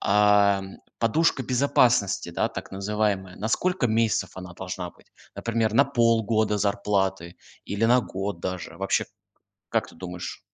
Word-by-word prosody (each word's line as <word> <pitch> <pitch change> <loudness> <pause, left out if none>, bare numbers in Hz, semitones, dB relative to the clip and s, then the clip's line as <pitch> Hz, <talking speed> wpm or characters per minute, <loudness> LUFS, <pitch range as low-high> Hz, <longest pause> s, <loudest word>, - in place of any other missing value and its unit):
ам, 100 -1 +3 0.2
подушка 135 +4 +2
безопасности, 125 -5 +2
да, - - 0
так - - -8
называемая, 100 -1 -1
на 110 - -3
сколько 180 +3 +1
месяцев 110 -4 +1
она 90 -1 -8
должна 90 -1 -5
быть? - - -25 0.3
Например, 115 -2 -1
на 140 +5 +6
полгода 115 -4 +2
зарплаты, 95 -3 -1 0.3
или 100 +3 -1
на 125 +2 +5
год 95 -5 -5
даже? 90 -2 -5
Вообще 95 0 0 0.6
как - - 0
ты - - -15
думаешь? 90 +1 -7
105 Hz, 135 wpm, -25 LUFS, 95-115 Hz, 0.6 s, на